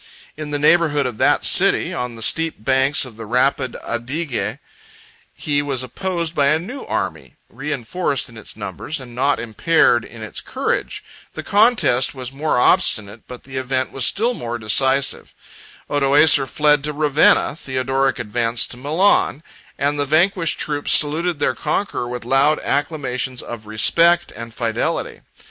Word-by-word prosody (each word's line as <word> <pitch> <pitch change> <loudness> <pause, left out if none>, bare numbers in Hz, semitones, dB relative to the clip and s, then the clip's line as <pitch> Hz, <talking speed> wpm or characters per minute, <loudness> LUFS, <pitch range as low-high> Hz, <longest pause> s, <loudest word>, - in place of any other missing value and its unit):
In 155 -1 -7
the 145 - -1
neighborhood 150 -1 +3
of 125 -4 -5
that - - +2
city, - - +4
on 125 -1 -4
the 115 - -4
steep 165 -8 +1
banks 135 +1 +2
of 120 -4 -12
the 115 - -8
rapid 130 +2 0
Adige, 125 0 -3 0.7
he 145 -2 -1
was 135 -3 -3
opposed 170 +5 -4
by 145 -4 +2
a 155 +2 +3
new 240 +12 -7
army, - - -4 0.2
reenforced 145 +1 -3
in 115 - -15
its 110 - -12
numbers, 155 0 -5
and 125 -2 -11
not 135 +4 +1
impaired 120 +1 +2
in 115 -2 -11
its 110 - -7
courage: - - -3 0.3
the - - -6
contest 205 - +2
was 130 -1 -7
more 150 +3 -1
obstinate, 110 - +1
but 125 -1 -10
the 135 0 -7
event 130 0 -2
was 135 - -4
still 235 +4 +1
more 120 - -5
decisive; 130 +5 0 0.5
Odoacer 145 0 +4
fled 150 -1 +2
to 150 0 -3
Ravenna, 150 -1 +3
Theodoric 135 -1 -1
advanced 115 +1 -2
to 125 - -6
Milan, 155 +2 +1 0.3
and 145 +1 -1
the 145 - +1
vanquished 165 +3 +1
troops 145 -1 -1
saluted 160 +3 +3
their 145 - 0
conqueror 190 -11 -3
with 125 -1 -6
loud 140 +4 +3
acclamations 130 -4 -2
of 110 -3 -9
respect 170 +11 +3
and 115 +1 -8
fidelity. 115 -1 -3
140 Hz, 155 wpm, -19 LUFS, 125-155 Hz, 0.7 s, city